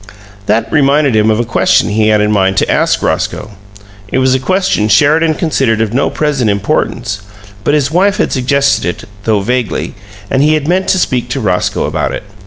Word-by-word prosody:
That 110 Hz, +2 st, 0 dB
reminded 140 Hz, -3 st, +2 dB
him 110 Hz, 0 st, +3 dB
of 110 Hz, 0 st, +1 dB
a 120 Hz, -, 0 dB
question 115 Hz, -, +2 dB
he 110 Hz, +1 st, +1 dB
had 105 Hz, -1 st, +3 dB
in 105 Hz, 0 st, +1 dB
mind 95 Hz, -2 st, +1 dB
to -, -, +1 dB
ask -, -, +1 dB
Roscoe. 110 Hz, -, -2 dB, 0.6 s
It -, -, 0 dB
was 130 Hz, 0 st, +2 dB
a 130 Hz, -, +1 dB
question 185 Hz, -, 0 dB
Sheridan 155 Hz, +8 st, +3 dB
considered 135 Hz, -, 0 dB
of 110 Hz, -1 st, -1 dB
no 135 Hz, -, +1 dB
present 140 Hz, -7 st, -1 dB
importance, 100 Hz, 0 st, -2 dB, 0.4 s
but 145 Hz, -, +1 dB
his 145 Hz, -1 st, 0 dB
wife 195 Hz, +4 st, +2 dB
had -, -, 0 dB
suggested 140 Hz, +1 st, +1 dB
it 90 Hz, +5 st, -4 dB, 0.2 s
though 110 Hz, -3 st, +1 dB
vaguely 125 Hz, +1 st, -2 dB, 0.4 s
and 135 Hz, -, +2 dB
he 155 Hz, +2 st, +3 dB
had 150 Hz, -1 st, -2 dB
meant 185 Hz, +2 st, 0 dB
to -, -, +2 dB
speak 125 Hz, -8 st, -1 dB
to 135 Hz, -, -2 dB
Roscoe 95 Hz, -6 st, -1 dB
about -, -, -2 dB
it. -, -, -5 dB
130 Hz, 195 wpm, -12 LUFS, 110-150 Hz, 0.6 s, him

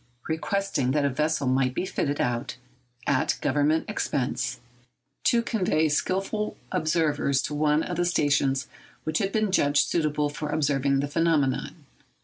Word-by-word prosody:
requesting 160 Hz, -3 st, -1 dB
that 145 Hz, +1 st, +2 dB
a 140 Hz, -, +1 dB
vessel 150 Hz, +1 st, 0 dB
might 130 Hz, 0 st, +1 dB
be -, -, -1 dB
fitted 145 Hz, -6 st, -2 dB
out, 120 Hz, 0 st, -1 dB, 0.5 s
at 135 Hz, -2 st, +1 dB
Government 145 Hz, +3 st, +1 dB
expense, 135 Hz, -10 st, -2 dB, 0.7 s
to 235 Hz, -1 st, +4 dB
convey 180 Hz, -9 st, +1 dB
skilful 195 Hz, +7 st, -1 dB
observers 155 Hz, -4 st, +1 dB
to -, -, -3 dB
one 150 Hz, +1 st, +2 dB
of 175 Hz, -, -4 dB
the 175 Hz, -, +1 dB
stations 140 Hz, -5 st, +1 dB, 0.4 s
which 155 Hz, 0 st, -1 dB
had 195 Hz, -, -1 dB
been 215 Hz, -2 st, +1 dB
judged 145 Hz, -5 st, +3 dB
suitable 150 Hz, -3 st, 0 dB
for 150 Hz, +1 st, -5 dB
observing 140 Hz, -2 st, +1 dB
the 145 Hz, -, -2 dB
phenomenon. 150 Hz, -3 st, 0 dB
150 Hz, 140 wpm, -26 LUFS, 140-165 Hz, 0.7 s, to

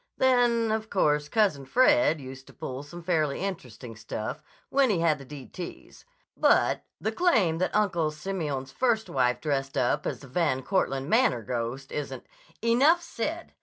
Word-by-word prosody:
Then, 240 Hz, -3 st, +3 dB
of 220 Hz, 0 st, -2 dB
course, 150 Hz, -5 st, +1 dB
Cousin 200 Hz, -11 st, +2 dB
Fred 255 Hz, -, +4 dB
used 130 Hz, 0 st, -10 dB
to -, -, -15 dB
pull 130 Hz, +1 st, -6 dB
some 170 Hz, +4 st, -10 dB
fairly 155 Hz, -5 st, 0 dB
interesting 125 Hz, -, -6 dB
stuff 110 Hz, +6 st, -5 dB, 0.3 s
when 270 Hz, -2 st, +3 dB
he 205 Hz, -, +2 dB
had 155 Hz, -3 st, +2 dB
the 140 Hz, -, -10 dB
d 140 Hz, -1 st, -9 dB
t's, 175 Hz, +5 st, -9 dB, 0.3 s
but -, -, +3 dB, 0.2 s
the -, -, -1 dB
claim 220 Hz, -, +2 dB
that 185 Hz, -, -1 dB
Uncle 175 Hz, -7 st, +2 dB
Simeon's 150 Hz, -5 st, -4 dB
first 235 Hz, -, 0 dB
wife 125 Hz, -2 st, +1 dB
dressed 135 Hz, -3 st, -2 dB
up 120 Hz, -, +1 dB
as -, -, -4 dB
the 140 Hz, -, -11 dB
Van 130 Hz, -1 st, 0 dB
Cortland 135 Hz, -6 st, 0 dB
Manor 225 Hz, -, +3 dB
ghost 125 Hz, +4 st, -4 dB
isn't—" 150 Hz, -1 st, -5 dB, 0.4 s
"Enough 280 Hz, +9 st, +4 dB
said! 330 Hz, +5 st, -4 dB
160 Hz, 165 wpm, -27 LUFS, 135-220 Hz, 0.4 s, Fred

